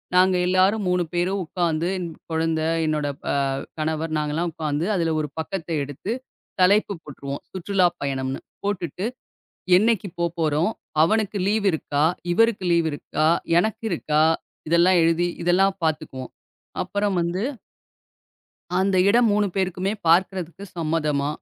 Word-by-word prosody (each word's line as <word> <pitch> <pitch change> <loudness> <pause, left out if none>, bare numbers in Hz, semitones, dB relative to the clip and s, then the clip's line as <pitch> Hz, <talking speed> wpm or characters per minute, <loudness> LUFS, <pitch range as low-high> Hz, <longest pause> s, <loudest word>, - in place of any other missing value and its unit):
நாங்க 185 0 +5
எல்லாரும் 190 +3 +3
3 180 0 +2
பேரும் 185 +3 0
உக்காந்து 170 -1 -1
என் 175 -2 -4 0.2
குழந்தை, 160 0 0 0.2
என்னோட 150 -2 0 0.3
அ - - +1 0.4
கணவர், 155 +1 -1
நாங்க 150 -1 -1
எல்லாம் 170 +1 -1
உக்காந்து 155 +1 -2
அதுல 165 -2 +1
ஒரு 150 -2 -2
பக்கத்த 165 +1 -4
எடுத்துத் 200 - -5 0.4
தலைப்பு 200 +2 +4
போட்டுருவோம். 140 -1 -7
சுற்றுலா 185 0 +2
பயணம்ன்னு. 135 -1 -2 0.2
போட்டுட்டு, 185 -1 -2 0.7
என்னைக்கு 210 0 +2
போப்போறோம்? 165 +1 +1 0.3
அவனுக்கு 210 +4 +1
லீவு 205 0 +1
இருக்கா? 145 -1 0 0.3
இவருக்கு 225 -1 +2
லீவு 170 -1 +3
இருக்கா? 150 +1 -1 0.3
எனக்கு 220 +4 0
இருக்கா? 155 -3 +1 0.5
இதெல்லாம் 175 +2 +5
எழுதி, 165 +1 +2 0.2
இதெல்லாம் 190 +2 +3
பாத்துக்குவோம். 155 -5 -3 0.5
அப்புறம் 205 -1 -1
வந்து 175 +4 -1 1.3
அந்த 190 0 +2
இடம் 235 +2 +5
3 205 0 +2
பேருக்குமே 190 +1 -1
பார்க்குறதுக்கு 180 +1 +2
சம்மதமா? 155 -3 0
175 Hz, 125 wpm, -23 LUFS, 155-195 Hz, 1.3 s, நாங்க